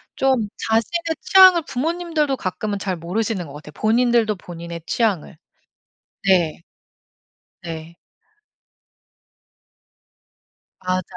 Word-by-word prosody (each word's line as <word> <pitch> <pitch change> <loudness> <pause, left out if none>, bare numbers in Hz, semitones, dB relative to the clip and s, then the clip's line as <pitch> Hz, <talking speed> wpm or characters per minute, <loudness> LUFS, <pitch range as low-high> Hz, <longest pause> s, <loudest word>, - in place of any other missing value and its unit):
좀 260 -5 +2 0.2
자신의 325 +9 0
취향을 370 -3 +7
부모님들도 315 0 -1
가끔은 205 +1 -3
잘 190 -2 -2
모르시는 185 +2 -2
것 140 - -11
같아요. 150 +1 -11
본인들도 230 -1 +3
본인의 170 -2 -8
취향을. 205 -10 0 0.9
네. 175 -5 +3 1.0
네. 165 0 -7 2.9
맞아요 185 0 -1
215 Hz, 210 characters per minute, -21 LUFS, 175-265 Hz, 2.9 s, 취향을